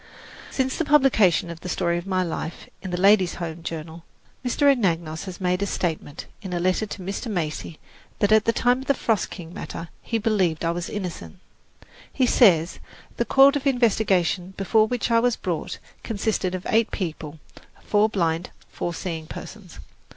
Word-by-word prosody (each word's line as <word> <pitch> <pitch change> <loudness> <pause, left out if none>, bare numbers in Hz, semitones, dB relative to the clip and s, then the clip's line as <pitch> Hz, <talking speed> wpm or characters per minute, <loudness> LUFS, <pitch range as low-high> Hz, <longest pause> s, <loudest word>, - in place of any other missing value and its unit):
Since 265 -1 -1
the - - +1
publication 240 - +4
of 165 - -9
"The 180 - -7
Story 170 -1 0
of 175 - -10
My 185 -1 +1
Life" 165 -1 -5
in 190 - -6
the 180 0 -2
Ladies' 195 -2 +4
Home 170 -1 -5
Journal, 165 0 -6 0.4
Mr. 250 +3 -1
Anagnos 170 - +1
has 185 -2 -8
made 180 0 0
a 200 - 0
statement, 160 -5 -3 0.2
in 190 -4 -6
a 175 - 0
letter 185 +4 +1
to 200 -2 -7
Mr. 195 +6 -4
Macy, 160 -4 -3 0.4
that 205 0 +1
at 215 0 +5
the 230 - +4
time 245 +2 +2
of 265 - -8
the 280 - +3
"Frost 225 -5 0
King" 170 -3 -9
matter, 165 -1 -7
he 230 - -2
believed 195 -8 +1
I 165 - +2
was 170 0 -4
innocent. 180 - -6 0.7
He 260 - +2
says, 180 -10 +4 0.4
the - - +1
court 275 +1 +6
of 285 -1 -1
investigation 195 -7 +1
before 215 +3 +3
which 245 0 -2
I 230 - +5
was 245 0 +2
brought 170 -4 -4 0.2
consisted 200 -4 -1
of 185 - -6
eight 225 0 +3
people: 160 -4 -5 0.5
four 210 +1 +3
blind, 170 -4 -1 0.2
four 175 -1 -4
seeing 160 -3 -5
persons. 190 -1 -10
185 Hz, 180 wpm, -24 LUFS, 170-220 Hz, 0.7 s, court